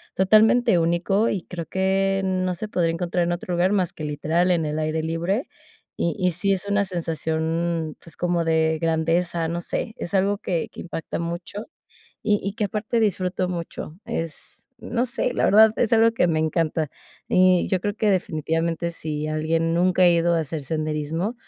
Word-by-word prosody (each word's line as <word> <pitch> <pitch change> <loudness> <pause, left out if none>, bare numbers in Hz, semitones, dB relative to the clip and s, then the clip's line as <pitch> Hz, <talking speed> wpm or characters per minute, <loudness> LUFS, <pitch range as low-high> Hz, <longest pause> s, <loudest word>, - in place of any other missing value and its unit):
totalmente 215 0 +4
único 175 +6 +1
y 190 -4 -2
creo 170 -3 -6
que 195 +1 +1
no 185 -1 0
se 215 +4 -5
podría 170 -5 +1
encontrar 175 +1 -1
en 175 - -1
otro 175 +1 -4
lugar 180 +3 +2
más 185 -4 +1
que 155 - -8
literal 160 +5 +1
en 165 -3 +1
el 150 +1 -2
aire 155 +1 -1
libre. 170 - -1 0.5
Y 170 - -1
y 180 -2 +1
sí 195 +4 0
es 190 +1 -3
una 200 0 +2
sensación, 165 -2 -2
pues 165 - -13
como 175 -1 0
de 160 -1 +2
grandeza, 165 +1 +1
no 170 +1 -3
sé, 220 - -3
es 175 - -6
algo 200 +2 +2
que 170 -3 -2
que - - -9
impacta 165 -2 -5
mucho, 170 +5 -5 0.6
y 210 -1 +2
y 200 +1 -3
que 215 - -1
aparte 215 +3 -1
disfruto 185 -3 0
mucho. 170 -2 -6
Es, 165 -10 -6
no 240 +1 -1
sé 245 0 -1
la - - +1
verdad 215 +1 +7
es 235 -1 +1
algo 225 0 +5
que 180 -6 +2
me 160 -1 +1
encanta. 155 -2 0 0.4
Y 185 -1 +4
yo 185 -2 0
creo 205 +1 -2
que 215 - +1
definitivamente 165 -1 -1
sí 155 -2 -4
alguien 165 +2 0
nunca 185 +1 +3
ha 180 - +8
ido 170 0 +3
a - - +2
hacer 155 0 -4
senderismo, 155 - -2
175 Hz, 185 wpm, -23 LUFS, 165-195 Hz, 0.6 s, ha